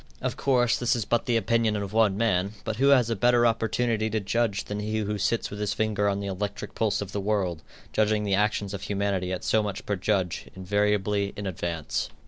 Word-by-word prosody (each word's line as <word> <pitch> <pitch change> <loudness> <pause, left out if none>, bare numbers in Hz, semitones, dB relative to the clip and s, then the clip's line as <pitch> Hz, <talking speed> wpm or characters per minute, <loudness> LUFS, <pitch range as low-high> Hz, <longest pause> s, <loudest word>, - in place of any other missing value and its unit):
Of - - -2
course, 125 -3 +2
this 120 0 +2
is 115 -4 -2
but 120 +2 0
the 120 -2 +3
opinion 115 0 +1
of 100 0 -4
one 110 -3 +3
man, 100 -3 +1
but 110 - -3
who 135 +3 +3
has 125 -5 +5
a - - +1
better 120 +3 +4
opportunity 115 0 +1
to 110 +1 0
judge 105 0 0
than 105 0 -5
he 110 +1 -2
who 105 -1 -2
sits 115 +4 0
with 105 - -6
his 105 -1 -1
finger 105 -2 +1
on 100 0 -1
the 100 - -4
electric 100 +1 -4
pulse 110 -2 0
of 95 - -10
the 100 - -2
world, 95 -5 -1 0.3
judging 105 0 +2
the 100 -1 0
actions 105 0 +1
of 100 - -5
humanity 100 -2 -1
at 90 - -3
so 110 - +3
much 105 0 -4
per 100 - 0
judge, 95 -2 -1
invariably 100 +1 0
in 105 - -4
advance? 85 -4 -3
105 Hz, 220 wpm, -26 LUFS, 100-110 Hz, 0.3 s, has